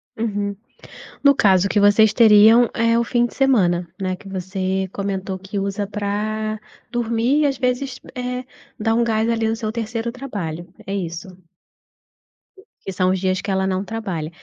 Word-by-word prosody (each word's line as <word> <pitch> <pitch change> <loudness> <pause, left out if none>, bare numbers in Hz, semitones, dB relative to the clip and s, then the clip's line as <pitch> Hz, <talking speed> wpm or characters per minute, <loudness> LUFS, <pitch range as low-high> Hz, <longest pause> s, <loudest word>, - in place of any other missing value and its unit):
Uhum. 205 -2 -2 0.7
No 280 -1 +6
caso 195 -4 +3
que 205 - +2
vocês 205 +1 +5
teriam 225 +1 +7
é 230 0 +2
o 235 - +2
fim 240 0 +1
de - - -15
semana, 180 -11 +2
né, 185 -1 -1
que 195 - -15
você 190 0 -2
comentou 195 -1 -3
que 195 +2 -5
usa 200 +1 -2
pra 210 +1 -3 0.3
dormir 240 +4 +1
e - - +3
às 275 -2 0
vezes, 250 +1 -1 0.2
eh, 250 0 -3 0.4
dar 225 +1 +1
um 235 - +3
gás 225 0 +1
ali 225 -1 +1
no 225 - 0
seu 220 -1 -3
terceiro 230 +1 -3
trabalho, 190 -11 -6 0.2
é 195 - -2
isso? 170 0 -4 1.5
Que 195 - -6
são 185 0 +1
os 190 - 0
dias 185 0 0
que 200 - -6
ela 190 0 +1
não 190 0 -1
trabalha. 190 -9 -4
210 Hz, 170 wpm, -21 LUFS, 190-230 Hz, 1.5 s, teriam